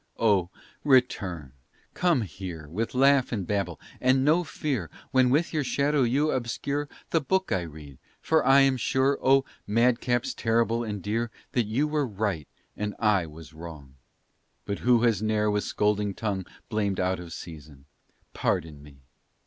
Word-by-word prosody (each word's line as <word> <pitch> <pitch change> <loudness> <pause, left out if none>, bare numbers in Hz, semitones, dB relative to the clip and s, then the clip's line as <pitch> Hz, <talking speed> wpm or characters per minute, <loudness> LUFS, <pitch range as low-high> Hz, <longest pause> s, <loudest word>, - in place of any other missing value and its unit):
Oh, 100 -6 +2 0.3
return 95 - +2 0.4
come 175 -8 +2
here 85 -4 -7
With 110 +11 -3
laugh 135 0 +4
and 100 -6 -2
babble 100 -5 -2 0.2
and 130 +1 +3
no 160 +4 +4
fear 130 - -3 0.2
When 130 -1 +4
with 150 +7 +1
your 155 -2 +1
shadow 140 +2 +1
you 140 +5 +2
obscure 140 +4 -2 0.2
The 165 - +3
book 190 +6 0
I 95 - +1
read, 75 -4 -10 0.2
for 160 -1 +2
I 135 +1 +6
am 135 -1 +3
sure, 130 +3 +1
Oh, 135 +1 +4 0.2
madcaps 120 +2 +1
terrible 115 0 +1
and 105 -4 -5
dear, 115 +3 -1 0.2
That 120 -4 0
you 130 +8 +1
were 150 -2 0
right 100 - -2 0.3
and 105 -1 -3
I 105 -6 +2
was 80 +1 -12
wrong. 80 -4 -10 0.7
But 100 0 -3
who 120 -1 +3
has 115 -5 +2
ne'er 105 -1 +1
with 105 0 0
scolding 105 -1 0
tongue 100 -4 -3 0.2
Blamed 105 -4 -1
out 95 0 0
of 85 -2 -9
season. 75 -4 -10 0.5
Pardon 80 -5 -1
me! 70 -1 -15
110 Hz, 155 wpm, -27 LUFS, 90-130 Hz, 0.7 s, I